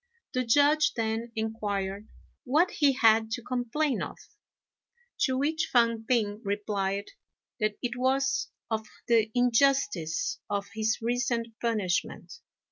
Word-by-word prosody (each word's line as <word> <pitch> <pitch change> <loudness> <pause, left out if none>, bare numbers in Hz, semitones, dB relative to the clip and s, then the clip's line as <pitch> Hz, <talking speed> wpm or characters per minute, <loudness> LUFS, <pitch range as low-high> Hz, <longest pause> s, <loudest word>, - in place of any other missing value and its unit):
The 255 - +1
Judge 290 +5 +4
then 225 +1 -2
inquired 205 -2 -3 0.4
what 310 +8 +2
he 285 -3 +3
had 225 -3 +4
to 240 - -4
complain 255 +4 -1
of; - - -5 1.0
to 260 -2 +2
which 310 +4 0
Fang 230 -2 +3
p'ing 215 -4 +1
replied 200 -1 -2 0.5
that 215 -1 0
it 245 0 -2
was 265 +2 +1 0.2
of 220 -1 -2 0.2
the 225 -2 +3
injustice 275 - +2
of 200 -1 -2
his 220 +1 0
recent 240 -1 0
punishment. 210 -6 -1
235 Hz, 120 wpm, -28 LUFS, 220-265 Hz, 1.0 s, Judge